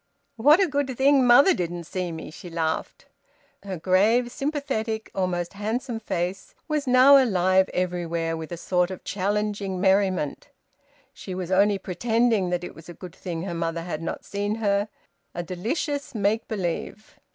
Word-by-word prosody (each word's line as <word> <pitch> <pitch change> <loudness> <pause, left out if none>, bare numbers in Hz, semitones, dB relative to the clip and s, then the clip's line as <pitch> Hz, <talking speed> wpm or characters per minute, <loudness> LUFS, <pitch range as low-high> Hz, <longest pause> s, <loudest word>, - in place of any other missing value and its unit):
"What 295 +9 +5
a 390 - +5
good 280 -5 -2
thing 270 -1 +4
mother 275 +10 +7
didn't 175 -1 -3
see 180 +1 -4
me!" 160 -2 -7
she 175 - -10
laughed. 165 -1 -3 0.6
Her 195 -2 -5
grave, 210 +8 +2
sympathetic, 270 -7 -3
almost 180 -2 -2
handsome 225 +4 -3
face 185 -2 -4
was 300 -3 -1
now 265 +2 +7
alive 190 -4 +2
everywhere 170 -2 -2
with 160 0 -7
a 175 - -4
sort 180 +1 0
of 185 - -8
challenging 205 -1 -2
merriment. 190 - +1 0.6
She 185 - -7
was 185 -1 -5
only 200 +2 +4
pretending 225 +1 +1
that 180 0 -1
it - - -7
was 165 +2 -14
a 175 - -9
good 180 -1 -10
thing 170 -3 -5
her 185 -2 -4
mother 165 0 -2
had 165 -2 -5
not 165 - -5
seen 205 +1 -2
her: 205 -1 0 0.5
a 175 - -3
delicious 265 - -3
make 215 +2 0
believe. 195 +1 -4
195 Hz, 160 wpm, -25 LUFS, 175-230 Hz, 0.6 s, mother